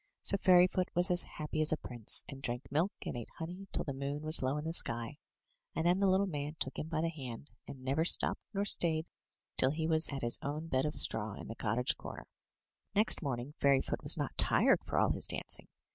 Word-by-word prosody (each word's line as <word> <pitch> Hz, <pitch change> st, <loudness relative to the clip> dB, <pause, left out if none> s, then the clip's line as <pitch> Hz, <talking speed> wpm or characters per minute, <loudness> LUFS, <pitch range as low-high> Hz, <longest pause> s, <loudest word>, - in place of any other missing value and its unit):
So -, -, +3 dB
Fairyfoot 180 Hz, -1 st, +3 dB
was 180 Hz, +2 st, +3 dB
as 175 Hz, 0 st, +3 dB
happy 155 Hz, 0 st, -3 dB
as 155 Hz, -, +7 dB
a 155 Hz, -, 0 dB
prince, 120 Hz, -6 st, +1 dB
and 135 Hz, -1 st, -10 dB
drank 120 Hz, -1 st, -5 dB
milk 165 Hz, +7 st, 0 dB
and -, -, -5 dB
ate 120 Hz, -2 st, -7 dB
honey 180 Hz, +4 st, -8 dB
till -, -, -2 dB
the 140 Hz, -, -5 dB
moon 140 Hz, +2 st, -5 dB
was 155 Hz, +1 st, +5 dB
low 130 Hz, +2 st, -1 dB
in 150 Hz, -, -5 dB
the 165 Hz, -, -3 dB
sky, 115 Hz, -3 st, -4 dB, 0.6 s
and 160 Hz, -, -2 dB
then 175 Hz, +2 st, +2 dB
the 200 Hz, -, +2 dB
little 190 Hz, +1 st, +2 dB
man 150 Hz, -4 st, -5 dB
took 135 Hz, -, -4 dB
him 155 Hz, -, -5 dB
by 160 Hz, -1 st, -2 dB
the 165 Hz, -, -1 dB
hand, 135 Hz, -4 st, -9 dB, 0.2 s
and 130 Hz, -2 st, -10 dB
never 135 Hz, +5 st, 0 dB
stopped 170 Hz, -, +1 dB
nor 200 Hz, -1 st, -2 dB
stayed 160 Hz, -4 st, +2 dB, 0.5 s
till 130 Hz, -, +4 dB
he 160 Hz, +3 st, -3 dB
was 160 Hz, 0 st, +5 dB
at 135 Hz, -3 st, -6 dB
his 120 Hz, -, +1 dB
own 150 Hz, +3 st, -5 dB
bed 135 Hz, 0 st, 0 dB
of 150 Hz, -, -5 dB
straw 110 Hz, -1 st, +2 dB
in -, -, -10 dB
the 115 Hz, -, -7 dB
cottage 115 Hz, +3 st, -1 dB
comer. -, -, -9 dB, 0.7 s
Next 215 Hz, +2 st, +5 dB
morning 135 Hz, -2 st, -5 dB
Fairyfoot 140 Hz, -1 st, +1 dB
was -, -, +7 dB
not -, -, -4 dB
tired -, -, +5 dB
for -, -, -3 dB
all -, -, +3 dB
his -, -, +1 dB
dancing. -, -, -4 dB
150 Hz, 225 wpm, -32 LUFS, 130-170 Hz, 0.7 s, as